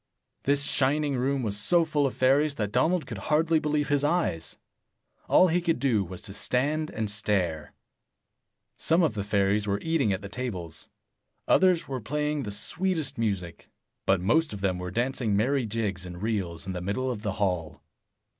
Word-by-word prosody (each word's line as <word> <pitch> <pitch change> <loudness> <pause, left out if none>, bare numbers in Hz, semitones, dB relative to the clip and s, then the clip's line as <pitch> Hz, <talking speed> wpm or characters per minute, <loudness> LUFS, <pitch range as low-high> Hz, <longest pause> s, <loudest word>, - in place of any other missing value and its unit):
This 140 +1 +3
shining 145 +1 +1
room 130 +1 0
was 105 -3 0
so 170 +11 +3
full 150 -3 +1
of 130 - -5
fairies 140 +3 +3
that 105 -5 -2
Donald 160 +8 +2
could - - -6
hardly 160 +1 +2
believe 150 -1 -1
his 145 -1 +2
eyes. 145 - -1 0.7
All 185 - +6
he 175 +2 +1
could 170 -1 +1
do 120 -6 +1
was 90 0 -8
to 95 - -8
stand 150 +8 0
and 110 -1 -3
stare. 100 -7 -1 1.0
Some 165 +2 +3
of 155 - +2
the 105 -2 -3
fairies 100 0 +1
were 100 0 +1
eating 160 -10 +1
at 95 0 -2
the - - -5
tables. 100 -7 -6 0.6
Others 180 -3 +4
were 130 -2 -4
playing 150 +4 -1
the 110 - -5
sweetest 160 - -1
music. 95 -7 -3 0.4
But - - +5
83 90 -1 -1
most 155 +5 +2
of 100 - -7
them 95 -2 0
were 90 0 -4
dancing 120 0 0
merry 125 +3 +1
jigs 105 -4 -2
and 90 0 -8
reels 95 -6 -3
in 95 - -4
the 90 - -4
middle 130 +8 -1
of 110 -4 -5
the 105 -2 -2
hall. 90 -6 -2
120 Hz, 185 wpm, -27 LUFS, 100-150 Hz, 1.0 s, All